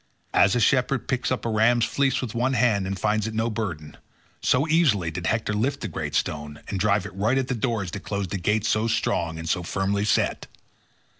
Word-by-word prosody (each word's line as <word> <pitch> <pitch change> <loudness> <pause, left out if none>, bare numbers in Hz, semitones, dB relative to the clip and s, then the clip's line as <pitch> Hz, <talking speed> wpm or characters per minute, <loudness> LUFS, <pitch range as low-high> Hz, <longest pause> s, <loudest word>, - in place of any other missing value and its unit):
As 100 +2 +4
a - - +2
shepherd 130 +2 +2
picks 125 -1 -1
up 130 - -2
a - - 0
ram's 115 +2 +3
fleece 140 -1 +1
with 115 - -5
one 125 +3 0
hand 115 -6 +2
and 95 0 -3
finds 110 0 +1
it 110 - -5
no 115 +1 0
burden, 85 -9 -5 0.4
so 140 +5 +2
easily 135 - +2
did 80 +1 -4
Hector 110 -1 0
lift 115 +7 -1
the - - -3
great - - -4
stone 75 -1 -2
and 95 - -2
drive 100 0 +2
it 100 - -8
right 110 +7 +1
at 135 -1 -1
the - - +1
doors 110 -6 -2
that - - -5
closed 100 -3 -4
the 95 - -2
gates 105 +4 +1
so 110 +1 +1
strong 85 -7 0
and 80 0 -6
so 90 +2 0
firmly 95 +3 -1
set. 105 - 0
110 Hz, 220 wpm, -25 LUFS, 95-120 Hz, 0.4 s, As